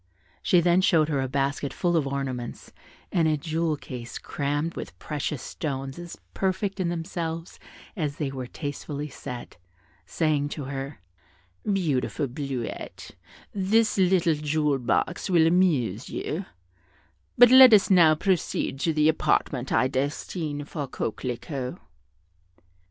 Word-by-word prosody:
She 180 - +4
then 175 +2 +4
showed 160 -4 +3
her 140 -3 0
a 130 - -1
basket 140 +1 -1
full 175 +3 0
of 155 -4 +2
ornaments 130 -3 -4 0.4
and 165 -3 +2
a 155 -1 +2
jewel 160 +1 -1
case 120 -4 -7
crammed 145 +3 -2
with - - -7
precious 150 -3 -4
stones 135 -1 -4
as 175 -1 -8 0.2
perfect 195 +1 -1
in 180 -2 0
themselves 165 -1 -4 0.4
as 150 -7 -2
they 150 -5 -3
were 130 -2 -5
tastefully 145 +1 -5
set, 125 -5 -8 0.5
saying 150 -3 0
to 145 - -4
her, 135 - -6 0.7
"Beautiful 155 -6 0
Bleuette, 130 -2 -5 0.4
this 210 +3 +2
little 180 -3 +4
jewel 150 -1 0
box 150 +10 0
will 170 -3 +5
amuse 150 - +2
you, 180 +6 -3 0.9
but 245 0 +8
let 260 -1 +10
us 205 -2 +5
now 165 -4 +7
proceed 170 -5 -1
to 160 +3 +1
the 150 0 +3
apartment 150 -4 +1
I 130 - +3
destine 145 +2 -3
for 145 -2 -5
Coquelicot." 125 +3 -4
150 Hz, 130 wpm, -26 LUFS, 135-175 Hz, 0.9 s, let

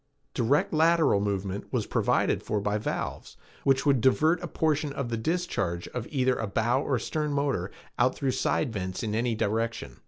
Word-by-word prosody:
Direct 130 +7 +1
lateral 160 -7 +4
movement 100 -1 -3
was - - 0
provided - - +1
for 105 - -1
by 105 +1 -1
valves - - -4 0.3
which 135 0 +2
would 135 -4 +3
divert 155 +7 +3
a 175 - -4
portion 155 -3 0
of 135 -4 -3
the 115 - -1
discharge 110 - -2
of 120 -2 -5
either 130 -2 +1
a 110 - -2
bow 120 +6 +1
or 135 -3 0
stern 150 +5 -2
motor 140 -10 0 0.3
out 125 +1 +3
through 135 -3 0
side 125 -1 0
vents 95 -1 -4
in 105 -2 -2
any 115 +1 0
direction. 115 +2 -2
125 Hz, 180 wpm, -27 LUFS, 105-145 Hz, 0.3 s, lateral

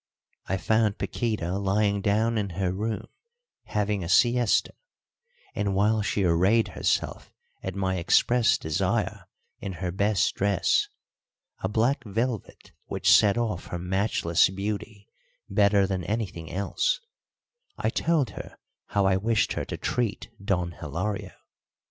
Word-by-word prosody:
I 95 - 0
found 110 +3 +1
Paquíta 100 -5 -2
lying 100 +1 +1
down 110 +3 +1
in 100 -1 -2
her 95 -2 0
room 110 +3 -3 0.6
having 105 -2 -1
a 85 - -5
siesta; 120 +4 +3 0.8
and 100 -2 -1
while 105 +2 +3
she 100 -1 0
arrayed 95 +6 +3
herself - - -1 0.3
at 95 0 -5
my 95 -1 -1
express 115 +7 +3
desire 80 -1 -1 0.3
in 95 - -5
her 90 0 -3
best 100 0 +1
dress 100 -1 +2 0.7
a 95 - -2
black 120 +5 +1
velvet 115 +1 -3 0.2
which - - +3
set 105 +1 +4
off 110 -7 -2
her 85 - -4
matchless 90 -2 +2
beauty 100 +2 -5 0.4
better 100 -1 +3
than 95 -2 -2
anything 95 -7 -3
else, 100 - 0 0.8
I - - 0
told 160 -8 +1
her - - -9 0.3
how 100 -1 +1
I 95 -1 +3
wished 110 +2 +1
her - - -3
to - - -5
treat 120 -4 -2
Don 90 -3 0
Hilario. 85 +6 -4
100 Hz, 130 wpm, -26 LUFS, 95-110 Hz, 0.8 s, set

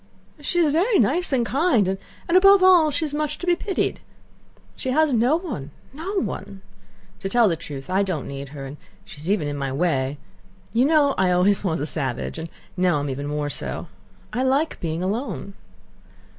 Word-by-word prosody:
She 295 +4 -2
is 325 -4 +4
very 390 +9 +3
nice 300 - +2
and 250 -3 +2
kind 265 - +2 0.4
and, 340 - +1
above 390 +1 +7
all, 360 -4 +6
she's 295 0 -2
much 300 0 -1
to - - -6
be 350 -1 +3
pitied. 390 +2 -2 0.8
She 260 - -4
has 300 +1 +3
no 245 +6 +3
one, 310 - -5 0.2
no 370 +6 -2
one. 195 0 -6 0.6
To 195 - -4
tell 235 +1 +4
the 170 - +1
truth, 145 -4 -8
I 185 +2 +1
don't 185 -7 -2
need 140 0 -6
her, 140 -1 -8
and 140 +2 -8 0.3
she's 150 +4 -8
even 195 -7 +1
in 145 0 -3
my 135 -1 -2
way. 140 -2 0 0.6
You 240 +3 +4
know 290 -2 +4
I 190 -1 +3
always 180 +3 +3
was 165 -5 0
a 145 - -1
savage, 135 -1 -3
and 165 +1 -6 0.3
now 180 -4 +2
am 145 -1 -2
even 140 +2 -4
more 145 0 -2
so. - - -5 0.4
I 250 - 0
like 270 +5 +1
being 165 +1 -3
alone.... 205 0 -3
205 Hz, 185 wpm, -23 LUFS, -, 0.8 s, above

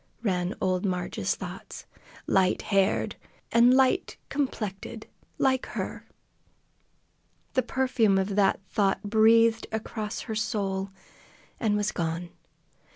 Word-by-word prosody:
ran 180 -3 0
old 185 -1 0
Marg's 180 -3 -1
thoughts. - - -8 0.4
"Light 190 -1 +2
haired, 195 -1 +1 0.3
an' 235 +1 +6
light 265 +7 +3
complected, 225 -5 -3 0.3
like 260 -1 +1
her!" - - -5 1.5
The 255 - +3
perfume 245 -5 +2
of 195 +1 0
that 200 -2 +3
thought 195 -2 +1
breathed 225 +2 +4
across 220 0 -4
her 225 - -5
soul, 200 -3 -1 0.7
and 210 -2 +1
was 205 0 0
gone. 170 +1 -3
210 Hz, 105 wpm, -27 LUFS, 195-230 Hz, 1.5 s, an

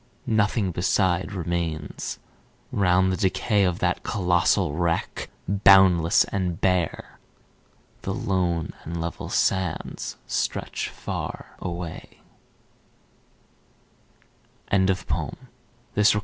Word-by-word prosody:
Nothing 105 -2 +1
beside 95 +2 +1
remains. 85 -4 -3 0.5
Round 95 -1 +3
the 95 - -1
decay 100 +1 +2
Of 90 -2 +1
that - - 0
colossal 90 -5 +2
wreck, 85 +1 -1 0.2
boundless 95 -3 +6
and 90 -4 -2
bare, 90 -3 0 0.8
The 95 - -3
lone 95 -7 -1
and 85 +1 -5
level 85 +1 -4
sands 95 -3 -1
stretch - - -2
far - - -6
away;" 85 -2 -6 2.5
Percy 95 -1 +4 1.1
Bysshe 105 +1 +5
Shelley. 105 - +1
90 Hz, 90 wpm, -25 LUFS, 85-95 Hz, 2.5 s, boundless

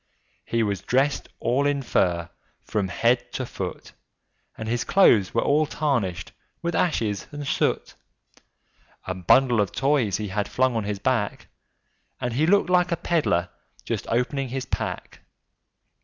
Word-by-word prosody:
He 115 -1 0
was 100 -4 -1
dressed 135 +3 0
all 140 +4 +1
in 140 -1 0
fur, 85 -7 +1 0.4
from 105 -3 -1
his 95 - -8
head 120 +1 +2
to 130 - -2
his 120 - -9
foot, 90 -2 -6 0.7
And 110 - -5
his 120 +1 0
clothes 115 - +4
were - - +3
all 150 +2 +2
tarnished 125 - -1 0.3
with 170 0 -1
ashes 110 - 0
and 145 -1 -6
soot; - - 0 1.1
A 95 - -2
bundle 115 +6 +4
of 100 - -1
Toys 135 -8 +1
he 105 -2 -4
had 105 +2 -1
flung 130 -1 +1
on 110 -2 -1
his 105 0 -2
back, 115 -1 -1 0.7
And 125 -1 -2
he 150 +6 +2
looked 195 -1 +3
like 180 -1 +3
a 170 - +1
peddler 95 - +1 0.4
just - - -3
opening 125 +3 -1
his 130 +1 -3
pack. - - -4
120 Hz, 155 wpm, -24 LUFS, 105-140 Hz, 1.1 s, clothes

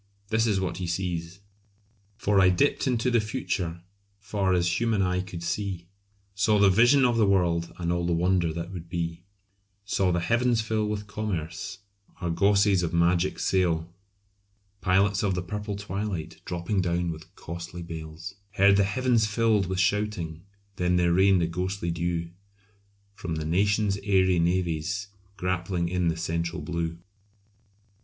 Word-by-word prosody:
This 110 +1 +2
is 100 -3 +2
what 95 -2 -2
he 90 -2 -3
sees 85 +1 -3 0.8
"For 100 -4 +3
I 95 - +6
dipt 135 +10 +2
into 125 0 +1
the 120 - +4
future, 95 -7 -3 0.3
far 100 -1 -1
as 90 -1 +2
human 115 -4 +1
eye 90 0 0
could 90 -2 -7
see, 90 0 -3 0.5
Saw 105 +2 +2
the 100 -1 +5
vision 120 +7 +5
of 120 -2 +2
the 110 -3 +4
world 85 -3 +1
and 85 -1 -1
all 85 0 -1
the - - 0
wonder 85 0 +2
that 85 +2 -5
would 85 -2 -8
be, 85 -1 -3 0.6
Saw 95 -1 +1
the 90 - +1
heavens 120 +5 +2
fill 110 -1 0
with 105 0 -3
commerce, 95 -6 -4 0.4
argosies 100 +2 +3
of 85 -1 -2
magic 85 +2 +2
sail, 85 -3 0 0.9
Pilots 95 +1 +2
of 100 -3 +1
the 90 - -2
purple 105 +2 -4
twilight 100 -4 -4
dropping 90 +3 -1
down 85 -1 0
with 80 0 -11
costly 85 +1 -7
bales, 80 +2 -7 0.2
Heard 100 0 +5
the 100 - +5
heavens 115 +2 +2
fill 110 0 +2
with 95 0 -2
shouting, 95 -4 0 0.4
then 90 0 +1
there 85 -1 +3
rained 95 0 +4
a - - +1
ghostly 90 +1 -2
dew, 85 0 -2 0.8
From 85 -5 -5
the 80 -1 -3
nations' 100 +4 +1
airy 95 -3 +3
navies, 90 +3 0 0.3
grappling 90 -1 -1
in 90 -1 0
the 80 -1 0
central 85 +1 -2
blue." 85 -1 -3
90 Hz, 155 wpm, -27 LUFS, 85-100 Hz, 0.9 s, I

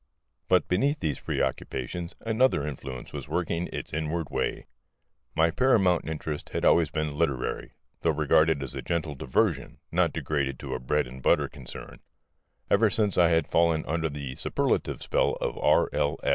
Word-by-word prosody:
But 90 -1 +3
beneath 140 +12 +1
these 80 -5 -2
preoccupations 85 +7 -3
another 115 - +2
influence 65 -3 -7
was - - -6
working 85 +1 -1
its - - -6
inward 80 0 -2
way. - - -2 0.7
My 80 +1 +3
paramount 95 -6 +3
interest 75 -1 -4
had - - -2
always 85 -3 +5
been 75 -1 -2
literary, 65 -3 -1 0.3
though - - +1
regarded 75 -1 +3
as 65 - -4
a - - -4
gentle 85 -3 -2
diversion, 65 -2 0
not 85 -1 +2
degraded 70 -3 -2
to 65 -2 -5
a 65 - -2
bread 75 +5 0
and 65 +1 -10
butter - - +3
concern. 60 - -10 0.7
Ever 110 +2 +4
since 100 -2 +1
I 85 -2 +6
had 80 -2 +1
fallen 85 -2 +3
under 80 0 -1
the 70 -2 -5
superlative 140 -1 -1
spell - - +1
of - - -2
R.L. - - +2
80 Hz, 160 wpm, -27 LUFS, 70-90 Hz, 0.7 s, I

